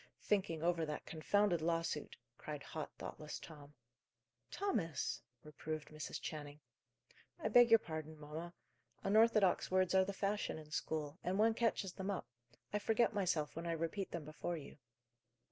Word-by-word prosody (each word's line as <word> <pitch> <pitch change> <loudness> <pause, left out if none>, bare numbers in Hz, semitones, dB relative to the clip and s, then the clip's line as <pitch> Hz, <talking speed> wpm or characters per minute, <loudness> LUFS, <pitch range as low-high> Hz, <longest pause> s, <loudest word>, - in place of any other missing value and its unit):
"Thinking 170 -6 +1
over 170 -1 +2
that 150 -1 -3
confounded 175 +2 +2
lawsuit," 165 -2 -1 0.2
cried 150 -2 -5
hot, 155 +2 -5
thoughtless 150 -1 -6
Tom. 150 -2 -12 0.7
"Thomas!" 195 - -1 0.2
reproved 155 0 -5
Mrs. 155 0 -5
Channing. 145 -1 -6 0.8
"I - - 0
beg 245 -1 +8
your 225 - +9
pardon, 155 -5 -6
mamma. 160 +4 -6 0.5
Unorthodox 215 -2 +5
words 185 0 +3
are 190 0 +6
the 195 - -2
fashion 200 -1 -1
in 155 -1 -11
school, 150 +1 -2
and 185 +2 0
one 220 +2 +5
catches 220 -5 0
them 190 0 -4
up. 200 - -2 0.5
I 210 - +2
forget 225 +2 +3
myself 180 -7 0
when 165 +1 -4
I 170 - +1
repeat 165 +4 -2
them 170 -4 -5
before 155 +3 -3
you." 150 - -10
170 Hz, 150 wpm, -38 LUFS, 155-200 Hz, 0.8 s, your